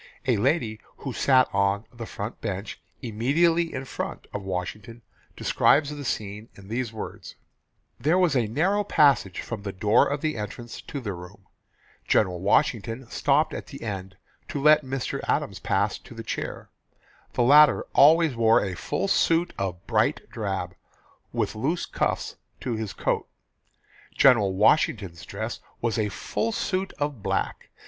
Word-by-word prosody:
A 125 -4 +2
lady 115 -2 +1 0.2
who 135 - -5
sat 130 +2 +4
on 100 +2 +1
"the 115 -2 -7
front 105 +4 -6
bench," 100 -1 -5 0.2
"immediately 165 +9 +2
in 130 0 -5
front" - - -5
of 100 - -3
Washington 95 +5 -5 0.3
describes 145 0 +3
the 145 -1 -6
scene 105 -3 -4
in 100 0 -14
these 120 0 -2
words: 105 -3 -8 0.6
"There 160 +5 +2
was 180 -6 +3
a 120 -4 +2
narrow 185 - +1
passage 140 - +3
from 115 -4 -6
the 100 -1 -4
door 105 +3 +3
of 145 +2 -2
entrance 120 -4 -4
to 140 - -6
the 105 -5 -3
room. 90 +3 -11 0.6
General 90 -4 +2
Washington 115 - +1
stopped - - +2
at - - -6
the - - -9
end 95 -3 -5 0.3
to - - -4
let 150 +1 +6
Mr. 130 -1 -3
Adams - - 0
pass - - 0
to - - -14
the - - -7
chair. - - -5 0.6
The 120 - +2
latter 145 +4 +6
always 160 -1 +6
wore 115 0 +5
a 95 - -3
full 190 - -2
suit 170 -2 +2
of 95 -1 -3
bright - - +1
drab, 95 -4 -3 0.6
with - - -1
loose 150 +11 -1
cuffs - - -2 0.2
to 125 - -2
his 110 -2 -4
coat. - - -1 0.9
General 115 -8 +5
Washington's 100 - +2
dress - - -5 0.2
was 115 0 -1
a 105 -1 +1
full 225 - -2
suit 190 -2 -2
of 145 -6 -3
black. - - -2
115 Hz, 155 wpm, -26 LUFS, 100-145 Hz, 0.9 s, let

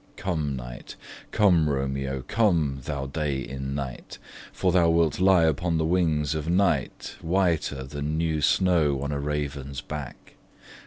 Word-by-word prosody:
Come 80 -7 -2
night! - - -8 0.3
Come, 90 -7 +3
Romeo! 70 -1 -2
come, 85 -11 +1
thou 70 -2 -3
day 70 0 -2
in 65 +2 -5
night; 65 -4 -6 0.3
For 95 - 0
thou 85 -2 +4
wilt 80 -1 +2
lie 95 -2 +5
upon 80 +2 +1
the 80 - +1
wings 80 -4 +1
of 80 +1 -3
night 95 +2 0
Whiter 80 -6 0
than 75 +3 -4
new 80 -2 0
snow 75 -3 +2
on 70 - -3
a 70 - -2
raven's 70 -2 -3
back. 75 -2 -8
75 Hz, 145 wpm, -26 LUFS, 70-85 Hz, 0.3 s, lie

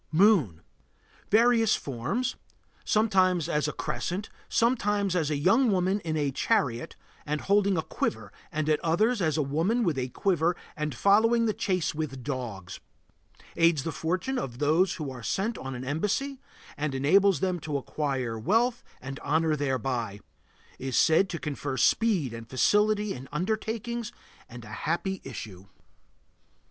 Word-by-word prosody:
MOON. 160 - +4 0.7
Various 225 0 +4
forms. 135 - -2 0.5
Sometimes 185 -6 +2
as 150 -3 0
a - - -1
crescent, 190 +6 -4 0.2
sometimes 205 -5 +1
as 160 -4 +1
a 150 - 0
young 225 - +3
woman 190 +1 +1
in 160 -4 -3
a 145 -2 0
chariot 120 -2 0 0.3
and 150 0 -2
holding 200 -1 +2
a 160 - 0
quiver, 110 -3 -3 0.2
and 155 0 -2
at 155 -1 +3
others 210 +8 +2
as 160 -3 +1
a 155 - +2
woman 165 - 0
with 160 -9 0
a 130 - -1
quiver 175 +3 +1 0.2
and 150 -3 -3
following 225 - +4
the 215 - +1
chase 185 -5 -1
with 150 -5 -4
dogs. 120 -10 -5 0.8
Aids 165 -4 +3
the 165 - -3
fortunes 185 - -2
of 120 - -5
those 160 +7 +2
who 150 -5 -5
are 125 -2 -8
sent 195 - -1
on 135 0 -5
an 125 - -6
embassy, 210 - -2 0.4
and 145 -2 -2
enables 190 +8 +4
them 185 -2 0
to 150 -2 -3
acquire 130 -5 -3
wealth 230 - +1 0.2
and 135 +1 -7
honor 155 +1 +1
thereby. 130 -7 -2 0.6
Is 130 -2 -2
said 170 +4 +4
to 170 - -3
confer 145 -3 -4
speed 180 - +2
and 115 0 -9
facility 210 +8 +2
in 130 +1 -9
undertakings 220 +6 -2 0.4
and 120 -1 -10
a - - -11 0.2
happy 190 +3 -1
issue. 100 -7 -8
160 Hz, 150 wpm, -27 LUFS, 135-205 Hz, 0.8 s, MOON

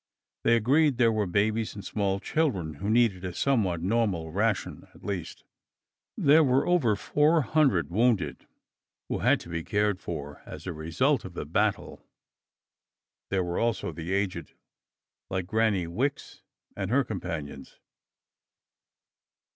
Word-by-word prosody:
They 115 - +4
agreed 135 +4 +3
there 120 -2 +4
were 105 -3 0
babies 105 +4 0
and 100 - -8
small 100 -2 -1
children 100 - -1
who 100 - -2
needed 110 -5 +2
a 90 -1 -4
somewhat 100 -11 +1
normal 95 -6 0
ration, 100 +3 -1
at - - -18
least. 95 -5 -5 0.7
There 155 +3 +5
were 130 -1 +2
over 155 -12 +3
four 150 +8 +2
hundred 110 - +2
wounded 105 - +1 0.6
who - - -1
had - - +3
to - - -11
be 85 -1 -3
cared 105 -1 0
for 75 -6 -6
as - - -10
a 90 - -3
result 85 - 0
of 90 -2 -9
the - - -4
battle. - - -1 1.3
There 95 -1 +1
were 85 0 -2
also 115 -1 -1
the 85 +2 -6
aged, 100 -1 -2 0.7
like 95 -1 -2
Granny 110 -2 +1
Wicks, 125 +12 -3 0.3
and 95 -1 -3
her 135 +4 +3
companions. 85 - -6
105 Hz, 140 wpm, -27 LUFS, 90-120 Hz, 1.3 s, There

